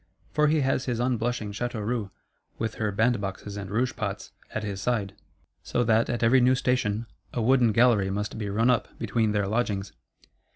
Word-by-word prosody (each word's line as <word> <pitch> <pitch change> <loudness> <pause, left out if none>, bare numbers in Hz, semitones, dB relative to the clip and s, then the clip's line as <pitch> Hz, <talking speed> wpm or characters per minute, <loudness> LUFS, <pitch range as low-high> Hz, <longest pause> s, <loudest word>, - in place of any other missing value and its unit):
For 150 0 +3
he 155 0 +3
has 135 -1 +1
his 120 -3 -1
unblushing 120 -3 -1
Châteauroux, 110 -1 -2 0.5
with 110 -1 -2
her 110 -1 +1
band 110 +2 +2
boxes 100 +1 -5
and 100 -2 -6
rouge 120 +5 0
pots, 100 -1 -4 0.2
at - - -4
his 100 -2 -4
side; 105 -4 -1 0.5
so 120 - 0
that, 115 0 +3
at 120 -1 -1
every 125 +3 +5
new 130 +1 +5
station, 120 -4 0 0.3
a - - -2
wooden 120 0 +4
gallery 110 -3 +4
must 105 +2 -3
be 105 -2 -3
run 115 +5 +3
up 120 - +1
between 110 -2 0
their 105 -1 0
lodgings. 100 -3 -1
115 Hz, 180 wpm, -27 LUFS, 105-125 Hz, 0.5 s, every